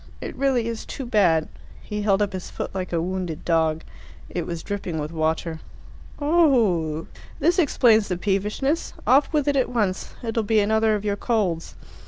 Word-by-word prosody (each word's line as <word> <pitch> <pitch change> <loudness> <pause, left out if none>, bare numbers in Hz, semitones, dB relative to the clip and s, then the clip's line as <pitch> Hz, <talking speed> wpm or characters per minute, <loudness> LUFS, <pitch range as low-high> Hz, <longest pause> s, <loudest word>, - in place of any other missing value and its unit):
It - - -6
really 260 -3 +1
is 230 -1 -4
too 270 - -6
bad." 180 -9 +3 0.4
He 210 -1 -4
held 205 -1 +3
up 200 - -3
his 185 -1 -5
foot - - -5
like 185 -1 -4
a 170 - +1
wounded 180 -3 -4
dog. 160 -2 +1 0.5
It 175 -2 -3
was 170 -2 -5
dripping 195 -5 -4
with 150 0 -3
water. 160 0 -1 0.6
"Oho! 230 - +2 0.3
This 350 +4 +3
explains 230 - +4
the 180 - -2
peevishness. 210 - -1
Off 270 +4 +4
with 295 -2 +1
it 285 - +2
at 265 - +2
once. 210 -6 -1
It'll 225 0 0
be 220 +1 +2
another 220 +1 +3
of 210 0 -4
your 205 -1 0
colds." 195 -8 -1
205 Hz, 175 wpm, -24 LUFS, 175-240 Hz, 0.6 s, explains